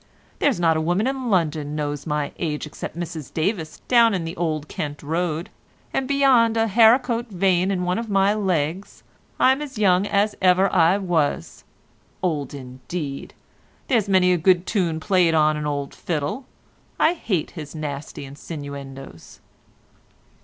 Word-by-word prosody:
there's 275 -10 +2
not 165 -2 +3
a 160 - 0
woman 175 +7 +1
in 265 -2 -2
London 155 -6 0
knows 145 -1 -3
my 150 -1 -1
age 150 -2 -2
except 150 +1 -8
Mrs 165 -5 -6
Davis 160 -2 -2
down 235 -4 +5
in 180 - -2
the 165 - -5
Old 155 -3 -2
Kent 145 -1 -5
Road, 165 +1 -2 0.4
and 265 - -1
beyond 260 -5 +4
a 225 - +3
haricot 235 +3 +4
vein 185 -1 +1
in 185 -2 -1
one 180 +3 0
of 230 -1 -5
my 195 0 +3
legs 185 -3 -2 0.4
I'm 265 +3 +4
as 280 -5 -7
young 195 -1 +3
as 205 +1 +1
ever 185 +1 +4
I 175 +1 +4
was. 165 - -1 0.6
Old 145 -6 -2
indeed! 135 +3 -7 0.5
There's 225 -7 +2
many 185 -1 +4
a - - +2
good 180 +1 +3
tune 175 -7 0
played 180 -2 +2
on 155 -1 +3
an 150 0 -3
old 140 -1 -3
fiddle. 165 - -3 0.5
I 325 - +4
hate 195 - -2
his 155 -3 -9
nasty 145 -2 -6
insinuendos." 140 - -9
175 Hz, 155 wpm, -23 LUFS, 150-205 Hz, 0.6 s, down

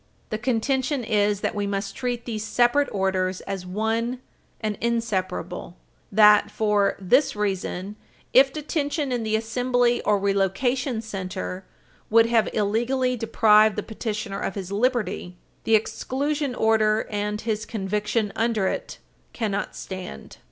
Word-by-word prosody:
The 215 - -2
contention 260 +3 0
is 210 -2 +1
that - - -1
we 205 -1 -2
must 200 0 -3
treat 245 -2 -3
these 220 -3 -3
separate 245 +6 +2
orders 190 -1 0
as 195 -2 -5
one 225 +5 -1 0.4
and 215 -2 -2
inseparable; 190 -7 -2 0.3
that, 210 0 +6
for 210 -2 +1
this 250 +10 +3
reason, 200 -1 -3 0.4
if 270 +1 +7
detention 295 -1 -2
in 245 -2 0
the 220 -1 0
assembly 245 +2 +1
or 210 - +2
relocation 220 +6 0
center 190 -2 -5 0.4
would 225 +1 +6
have 230 -1 +2
illegally 240 +5 +1
deprived 215 -2 +4
the 210 - -2
petitioner 215 -2 -4
of - - -3
his 195 -2 -5
liberty, 210 -5 -1 0.3
the 225 - +5
exclusion 280 +5 -1
order 220 -1 +2
and 210 0 -2
his 220 -1 -2
conviction 210 0 -1
under 225 -3 +1
it - - -3 0.4
cannot 210 -4 -2
stand. 185 - -8
215 Hz, 130 wpm, -24 LUFS, 200-240 Hz, 0.4 s, if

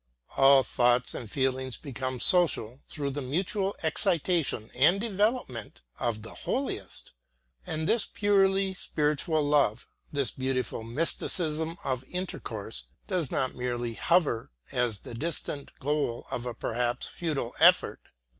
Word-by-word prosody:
All 135 0 +7
thoughts 120 +1 +2
and 115 - -6
feelings 130 -1 -1
become 130 -2 -5
social 140 -9 +4
through 140 -2 -2
the 145 +2 -4
mutual 190 +8 -1
excitation 160 - +1
and 165 +9 +4
development 205 - -1 0.2
of 110 -3 -2
the 115 - -9
holiest. 250 - -3 0.6
And 155 0 -2
this 230 -3 +3
purely 195 -1 +2
spiritual 155 -2 0
love, 145 -6 +2 0.2
this 140 -3 +1
beautiful 130 -3 -2
mysticism 160 +5 0
of 130 -1 -2
intercourse, 115 - -4 0.2
does 180 -8 -1
not 130 - -1
merely 120 -1 -3
hover 150 -4 +1 0.2
as 120 -5 0
the - - -9
distant 145 +1 -3
goal 140 -4 -1
of 125 0 -3
a 120 - -4
perhaps 120 +2 -1
futile 150 -8 -3
effort. - - +5
140 Hz, 125 wpm, -28 LUFS, 120-170 Hz, 0.6 s, All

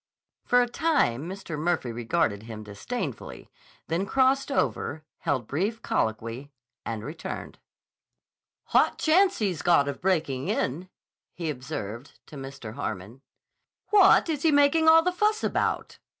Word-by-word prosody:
For 245 -1 +4
a - - -2
time 235 - +1
Mr. 190 -5 -6
Murphy 160 -6 0
regarded 115 -2 0
him 110 -1 -8
disdainfully, 105 - -6 0.4
then 170 +5 -1
crossed 270 +4 +2
over, 155 - -1 0.2
held 140 -8 -1
brief 200 - -2
colloquy, 115 +5 -2 0.3
and 110 -2 -4
returned. 155 +5 -7 1.1
"Hot - - +4
chance 370 +4 +3
he's 190 -7 -1
got 170 -5 +4
of 140 - -4
breaking 160 -8 0
in," 170 +8 -2 0.5
he 165 -3 -2
observed 125 -2 -7
to - - -13
Mr. 135 -5 -8
Harmon. 110 +6 -6 0.7
"What 395 -3 +6
is 305 -4 -2
he 320 - +3
making 290 +3 +4
all 325 0 +7
the 360 - +1
fuss 425 +4 +1
about?" - - -1
165 Hz, 135 wpm, -26 LUFS, -, 1.1 s, all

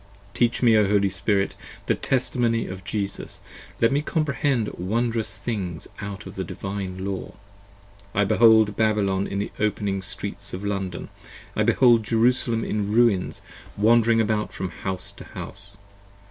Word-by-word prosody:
Teach 120 +2 +1
me, 115 -2 +6
O 105 -2 +4
Holy 100 -1 +3
Spirit, 100 +1 0 0.3
the - - +2
Testimony 120 -3 0
of 95 0 -7
Jesus! 100 -1 -4 0.4
let 115 - +4
me 140 - +2
15 150 - -6
Comprehend 140 -6 +1
wonderous 115 +4 -1
things 95 -8 -4
out 100 -1 -6
of - - -8
the - - -3
Divine 95 -1 -5
Law. 100 -1 -4 0.8
I 105 - +4
behold 110 0 +5
Babylon 100 -3 +1
in 100 - -4
the 100 - -2
opening 100 -2 0
Streets 90 - -5
of 95 +2 -6
London, 95 -3 -3 0.5
I - - +1
behold 120 -3 +5
Jerusalem 115 +1 +2
in 105 -1 -1
ruins 110 -4 +2 0.3
wandering 115 +2 +4
about 110 -1 0
from 95 - -4
house 95 +1 -4
to - - -11
house. 100 +1 -7
105 Hz, 145 wpm, -24 LUFS, 100-115 Hz, 0.8 s, me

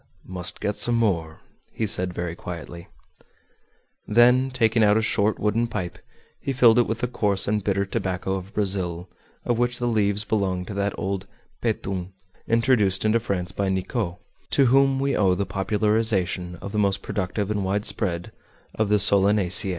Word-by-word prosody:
"Must 90 -2 -7
get 105 0 -2
some 120 - +3
more," 85 -9 -1 0.3
he 110 - -2
said 90 -3 +2
very 85 -1 -4
quietly. 85 0 -8 1.2
Then 125 +4 +4
taking 115 -3 +2
out 105 0 +4
a - - +2
short 105 0 +1
wooden 110 +3 0
pipe, 90 -6 -5 0.4
he 135 - -3
filled 120 -2 +5
it 120 - +2
with 115 +1 -3
the 125 - 0
coarse 105 -5 0
and 105 0 0
bitter 100 0 0
tobacco 95 -2 -3
of 95 +1 -5
Brazil, 95 -4 -1 0.4
of 120 -1 0
which 120 0 +1
the 120 - -2
leaves 105 -2 +1
belong 95 -4 -1
to 100 - -7
that 100 0 -2
old 95 +1 -3 0.3
"petun" 95 -1 -3 0.3
introduced 115 -5 +2
into 110 +2 +3
France 90 -5 -3
by 100 0 -2
Nicot, 95 0 -2 0.3
to 140 - +4
whom 135 +1 +3
we 140 +1 0
owe 95 -3 +3
the 100 - -2
popularization 95 -3 0
of 100 - -6
the 105 - -1
most 100 -1 0
productive 100 +1 -3
and 105 -2 -1
widespread 95 -2 -2 0.4
of 110 -2 -1
the 105 - +4
solanaceae. 100 -1 +5
100 Hz, 165 wpm, -24 LUFS, 95-115 Hz, 1.2 s, filled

